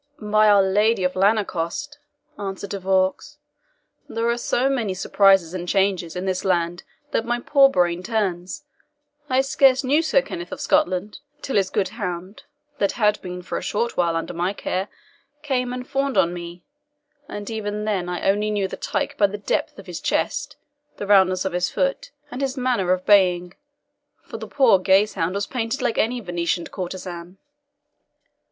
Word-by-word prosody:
"By 215 0 +3
our 200 -1 +6
Lady 205 +2 +2
of 180 0 0
Lanercost," 205 - 0 0.4
answered 195 0 -5
De 200 - -3
Vaux, 190 +10 0 0.7
"there 230 +1 -1
are 235 - +1
so 245 +2 +1
many 235 -8 -1
surprises 195 -2 +3
and 175 -1 -4
changes 190 -4 +1
in 180 +1 -3
this 185 -1 -1
land 175 -2 0 0.3
that - - 0
my 240 +1 -1
poor 275 +2 +5
brain 175 -5 +1
turns. 190 - -2 0.7
I 260 0 +3
scarce 270 -1 +3
knew 285 +5 +3
Sir - - +2
Kenneth 345 -6 -7
of 285 - -6
Scotland, 215 -9 0 0.2
till 270 - -3
his 195 -2 +2
good 190 - 0
hound, 195 +3 -6 0.3
that 200 - +1
had 210 -3 +1
been 180 0 -7
for - - -3
a - - -9
short 235 +3 -2
while 170 -2 +1
under 165 - -3
my 175 +3 -1
care, 190 -1 -3 0.6
came 250 -4 -1
and 250 0 -6
fawned 275 0 -1
on 170 +1 +3
me; 175 0 -8 0.7
and 205 0 -6
even 210 -1 -3
then 190 -5 -1
I 180 +1 -3
only 205 +2 +2
knew 205 -2 0
the - - -7
tyke - - -2
by 205 - +6
the 200 +1 -6
depth 205 - -2
of 195 - -11
his 180 -3 -7
chest, - - -1 0.4
the - - -4
roundness 190 -2 +4
of 190 - -2
his 180 0 0
foot, - - -1 0.2
and 255 - -5
his 270 0 -2
manner 245 -8 +1
of 185 0 0
baying, 180 -3 +4 0.7
for - - -8
the - - -7
poor 255 -9 +4
gazehound 190 -2 +2
was 200 0 -1
painted 235 +1 -3
like 240 -3 0
any 245 +2 +1
Venetian 175 -2 -2
courtesan." 180 -1 -7
200 Hz, 175 wpm, -22 LUFS, 180-240 Hz, 0.7 s, our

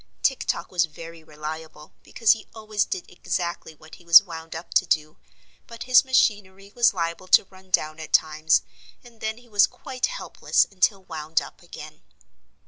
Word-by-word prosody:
Tik 270 - +1
Tok - - -2
was 180 -1 +2
very 165 +1 -12
reliable 155 0 -9
because 225 -3 +2
he 225 - -1
always 215 -2 -1
did 180 - -5
exactly 175 -2 -4
what 155 +1 -18
he - - -19
was 170 +3 +8
wound 165 -3 -9
up 165 +2 -8
to 185 - +3
do, 155 -1 -1 0.5
but 230 -1 -9
his 250 0 +5
machinery 205 -6 0
was 240 - +4
liable 170 -1 -4
to 185 - +6
run 190 0 -18
down 155 -3 0
at 160 - -9
times 155 0 +2 0.4
and 235 -2 -18
then 220 0 -3
he 245 0 -18
was 205 -3 +4
quite 255 -1 -4
helpless - - 0
until 195 +1 +1
wound 160 -2 -2
up - - -11
again. - - -12
180 Hz, 175 wpm, -24 LUFS, 160-215 Hz, 0.5 s, was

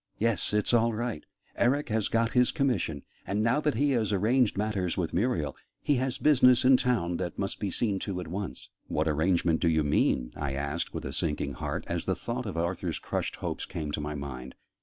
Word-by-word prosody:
Yes, 115 -1 +1
it's 105 +3 +1
all 115 0 +4
right: 115 -6 -3 0.3
Eric 140 +4 +1
has 110 -1 +1
got 115 0 +1
his 125 -1 +4
commission; 110 - 0 0.2
and, 100 +3 0
now 115 +6 +3
that 150 -1 0
he 145 0 +2
has 115 -5 +1
arranged 110 +3 +2
matters 100 -4 -1
with 85 -4 -1
Muriel, 85 - 0 0.2
he 145 - +1
has 130 0 -1
business 125 -4 +5
in 130 0 +8
town 115 -10 +1
that 85 - -4
must 95 -1 -3
be 100 - -1
seen 100 +1 0
to 95 -3 -3
at 90 - -6
once." 95 +4 -5 0.2
"What 75 +2 0
arrangement 80 +2 +2
do 85 - +3
you 80 -1 +2
mean?" 65 -4 +1
I 75 -2 -3
asked 70 +4 -2
with - - -5
a 65 - -4
sinking 80 -2 -1
heart, - - -4
as - - -2
the - - +1
thought 120 0 -4
of 95 - -5
Arthur's 85 +2 -1
crushed - - -3
hopes - - -4
came 75 -1 -4
to 75 - -2
my 75 0 -4
mind. 65 -3 -7
100 Hz, 210 wpm, -29 LUFS, 80-120 Hz, 0.3 s, in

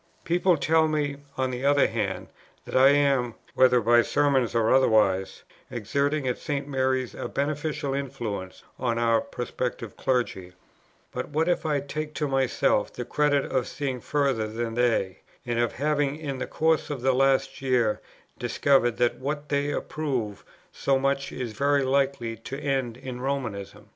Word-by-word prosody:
"People 175 0 +2
tell 160 +1 +3
me, 145 -2 -1 0.2
on 130 -1 0
the 125 +1 -5
other 145 +1 +4
hand, - - -2 0.4
that - - -7
I 130 +1 +7
am, 140 -4 +2 0.2
whether 130 -1 +5
by 120 +1 +5
sermons 135 -2 +1
or 115 0 +3
otherwise, 105 -7 +3 0.3
exerting 140 +5 -1
at 125 - -1
St. 145 -2 -3
Mary's 130 -2 0
a - - -5
beneficial 150 0 -2
influence 115 -9 -5 0.2
on 120 -2 0
our 115 -1 +3
prospective 120 -4 -4
clergy; 105 -8 -1 0.6
but - - -4
what 160 +2 0
if 175 -2 +1
I 145 -2 +1
take 150 +2 -5
to 150 - -1
myself 135 -6 +1
the 125 - -6
credit 145 0 +1
of 130 -2 0
seeing 135 -4 -3
further 135 -7 0
than 115 +1 -3
they, 115 -6 +1 0.3
and 120 -1 -1
of 120 -1 +1
having 145 0 0
in 145 -4 -5
the - - -3
course 160 0 +1
of 140 -4 -4
the 130 0 +3
last 135 +1 +2
year 125 -5 +1 0.4
discovered 130 -4 +2
that 120 -1 +1
what 145 +2 -4
they 145 0 0
approve 130 -13 -3 0.3
so 135 -1 +1
much 135 0 0
is 125 -3 -4
very 140 +2 +2
likely 135 -3 0
to 130 +5 -7
end 135 -5 -1
in 125 -1 -7
Romanism? 125 -8 -4
135 Hz, 160 wpm, -26 LUFS, 120-145 Hz, 0.6 s, I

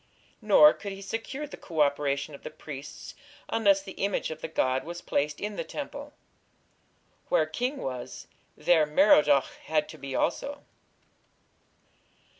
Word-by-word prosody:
Nor 190 -8 +7
could 200 -2 -7
he 195 - -9
secure 230 +8 -4
the 295 - -10
co 160 -3 -2
operation 140 0 +1
of 140 - -10
the - - -6
priests 145 -2 -9 0.4
unless 200 -3 +3
the 195 - -8
image 200 -4 0
of 155 - -7
the - - -3
god 130 -4 0
was 175 +1 -6
placed 150 -3 -1
in 210 0 -4
the - - -1
temple. 285 0 -7 1.2
Where - - +3
king 255 +4 -2
was, 125 - -6 0.3
there 160 -3 +4
Merodach 150 -4 +4
had 155 -1 +1
to 155 - -10
be 135 -1 -5
also. 285 +11 -1
165 Hz, 145 wpm, -28 LUFS, 145-215 Hz, 1.2 s, Nor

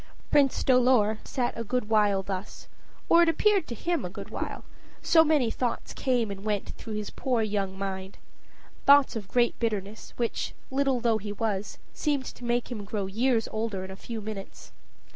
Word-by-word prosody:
Prince 280 -3 +3
Dolor 250 -4 +4
sat 245 -2 -2
a 230 - -3
good 245 0 -1
while 205 -3 +3
thus, 190 0 -6 0.4
or 340 - +6
it 340 - +5
appeared 400 +1 +3
to 235 - -5
him 340 +4 -1
a 180 - -3
good - - -9
while, - - -4 0.4
so 320 -1 +6
many 295 -7 +2
thoughts 245 0 -2
came 245 -6 0
and 195 0 -7
went 210 -2 -1
through 225 - -8
his 210 -1 -4
poor 245 -4 0
young 200 -3 -2
mind 190 -1 -5 0.7
thoughts 280 -2 +7
of 210 -4 -5
great 240 +2 +1
bitterness, 215 -2 -3
which, 235 -1 -2 0.2
little 270 -1 +2
though 230 -2 +2
he 205 0 -5
was, 210 -1 -2 0.2
seemed 285 -4 -1
to 245 - -9
make 240 +1 -1
him 215 -4 -4
grow 200 0 -3
years 225 +4 +1
older 215 -3 -2
in 190 - -9
a - - -7
few 225 +3 -6
minutes. 205 -2 -8
225 Hz, 180 wpm, -28 LUFS, 205-255 Hz, 0.7 s, thoughts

